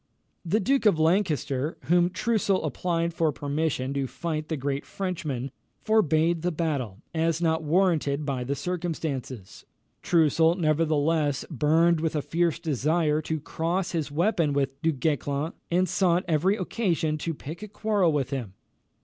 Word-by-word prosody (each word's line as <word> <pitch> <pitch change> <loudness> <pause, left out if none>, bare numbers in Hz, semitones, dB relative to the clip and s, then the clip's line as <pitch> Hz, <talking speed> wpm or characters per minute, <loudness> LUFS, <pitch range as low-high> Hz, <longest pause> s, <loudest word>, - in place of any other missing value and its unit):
The 185 +5 +1
Duke 260 +3 +2
of 200 - +4
Lancaster, 155 - +1
to - - -18
whom 175 0 +4
Troussel 200 -1 0
applied 170 +3 -1
for 160 -2 +1
permission 145 -2 -2
to 140 -1 -1
fight 155 +1 -4
the 160 - -1
great 140 +1 -2
Frenchman, 145 -5 -4 0.3
forbade 170 -6 +2
the 180 +2 0
battle, 140 - -3
as 165 0 +1
not 160 -1 +1
warranted 155 -3 +1
by 135 -3 -2
the 140 +3 -2
circumstances. 150 - -4 0.4
Troussel 165 0 +3
nevertheless 155 -3 +1
burned 160 +4 +3
with 160 -1 -1
a 150 - 0
fierce 170 0 0
desire 155 +1 +1
to 160 0 -3
cross 170 +5 -2
his 160 -4 -2
weapon 165 -1 +1
with 135 0 -1
Du 165 0 +2
Guesclin, 145 +1 -1 0.2
and 180 +2 +2
sought 180 0 +2
every 175 +5 +2
occasion 175 -6 -1
to 165 +1 -3
pick 155 +6 -8
a 215 - -6
quarrel 205 -4 +1
with 140 -3 -1
him. 120 -9 -4
160 Hz, 150 wpm, -26 LUFS, 145-175 Hz, 0.4 s, of